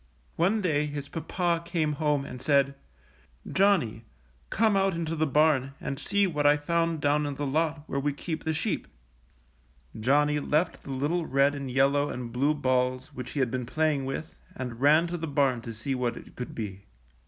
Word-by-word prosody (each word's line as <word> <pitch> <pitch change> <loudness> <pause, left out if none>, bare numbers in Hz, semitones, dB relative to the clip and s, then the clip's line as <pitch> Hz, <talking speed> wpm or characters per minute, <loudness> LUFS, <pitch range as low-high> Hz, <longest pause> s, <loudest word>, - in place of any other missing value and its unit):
One 195 +6 +2
day 150 -5 +1
his 145 -1 -5
papa 170 +2 -1
came 165 -3 0
home 150 -2 +1
and 125 -2 -8
said: 140 -1 +3 0.7
^ - - -7
^Johnny, 185 - +3 0.5
come 220 -1 +2
out 195 -2 +2
into 165 -1 -2
the 155 0 +1
barn 140 -2 +3
and 135 - -4
see 200 0 +2
what 150 -6 -1
I 145 +1 +6
found 165 +1 0
down 145 +1 +2
in 145 - -4
the 145 +1 -3
lot 155 +2 0
where 140 - -2
we 145 +1 0
keep 160 +3 -5
the 160 - 0
sheep.'' 155 - -2 1.1
Johnny 145 +5 +3
left 150 +4 0
the - - -12
little 150 +6 -1
red 140 +2 +3
and 140 -2 -5
yellow 140 +3 +2
and 125 -2 -5
blue 140 +5 +1
balls 130 +1 0
which 125 -2 -7
he 145 - 0
had 125 -3 +1
been 125 -2 -3
playing 155 -1 +1
with 135 +4 -5 0.2
and 125 -2 -6
ran 155 +4 +5
to 175 0 -3
the 165 -1 -4
barn 140 -4 +1
to 115 - -7
see 115 +5 -3
what 125 -2 -1
it - - -12
could 125 - -6
be. 100 -3 -6
145 Hz, 195 wpm, -28 LUFS, 135-160 Hz, 1.1 s, I